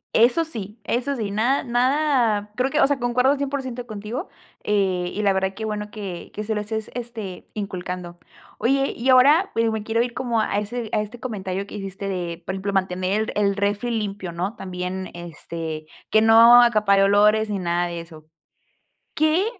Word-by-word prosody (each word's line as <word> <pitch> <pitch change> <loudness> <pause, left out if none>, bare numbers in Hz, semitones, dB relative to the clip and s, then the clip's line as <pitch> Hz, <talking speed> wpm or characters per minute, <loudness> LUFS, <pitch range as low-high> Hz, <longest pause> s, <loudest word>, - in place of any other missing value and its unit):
Eso 245 +9 +4
sí, 215 -7 -7
eso 255 +4 -1
sí, 210 -4 -3
nada 240 +7 +1
nada 245 -4 +1
creo 255 +1 +1
que, 305 +2 0
o - - +6
sea, 280 -1 0
concuerdo 250 +3 +2
100% 265 -3 -4
contigo, 215 - -5 0.4
eh, 185 -4 0
y 210 - -3
la 200 - +4
verdad 190 0 -1
qué 220 +1 -5
bueno 210 -1 -4
que 195 -5 -7
que 210 - -3
se 220 +1 -2
lo 210 - -1
estés, 220 +1 -4
este, 230 -6 -7
inculcando. 180 -3 -5 0.4
Oye, 275 +3 +1
y 250 +3 -1
ahora, 290 +9 +6
pues, 230 0 +2
me 220 -1 -2
quiero 225 +2 +1
ir, 240 -1 -5
como 240 -3 -1
a 210 -1 0
ese 225 +2 -4
a 210 - +2
este 215 +3 -8
comentario 200 -5 -4
que - - -13
hiciste 195 0 -6
de, 175 -2 -4
por - - -3
ejemplo, 195 +1 -3
mantener 190 +3 0
el 200 -1 +2
refri 205 +3 -1
limpio, 205 -5 -3
¿no? 185 +7 -3
También, 185 -1 -5
este, 165 -2 -6 0.2
que 215 - +5
no 230 +2 +8
acapare 215 -4 +4
olores, 210 +2 +4
ni 205 - -1
nada 175 -1 0
de 170 -1 -5
eso. 155 -2 -14 0.9
¿Qué 315 +6 +3
210 Hz, 185 wpm, -23 LUFS, 190-240 Hz, 0.9 s, no